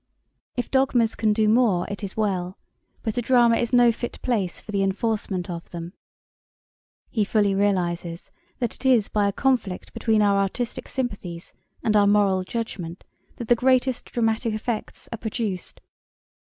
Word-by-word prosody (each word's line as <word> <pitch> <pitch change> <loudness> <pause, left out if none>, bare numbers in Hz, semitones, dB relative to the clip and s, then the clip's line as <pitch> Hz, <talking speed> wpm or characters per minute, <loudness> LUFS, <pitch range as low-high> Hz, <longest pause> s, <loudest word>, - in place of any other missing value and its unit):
If 245 - -3
dogmas 260 -4 +3
can 215 -1 +1
do 215 0 +2
more 215 -6 +3
it 205 +1 -6
is 195 +1 -5
well: 190 -4 -1 0.5
but 220 0 -1
a - - 0
drama 240 -1 +4
is 235 - -1
no 245 -1 +6
fit 240 +1 -6
place 210 -8 -1
for - - -9
the 200 -1 0
enforcement 195 -2 -1
of 170 -1 -6
them.' 170 +1 -7 1.2
He 220 - +1
fully 205 -1 +2
realises 175 -4 -1 0.3
that 240 -4 -2
it - - -12
is 250 -6 +4
by 205 -1 +2
a - - +1
conflict 225 -6 -1
between 220 -2 +2
our 200 -1 +3
artistic 210 +5 -2
sympathies 200 -10 -5 0.3
and 215 - +2
our 205 -1 +5
moral 200 -2 +3
judgment 185 -5 -5 0.3
that 235 - -7
the 240 - +5
greatest 255 +1 +2
dramatic 225 -1 0
effects 220 0 -4
are 230 - -5
produced. 215 -4 -4
215 Hz, 160 wpm, -24 LUFS, 195-235 Hz, 1.2 s, no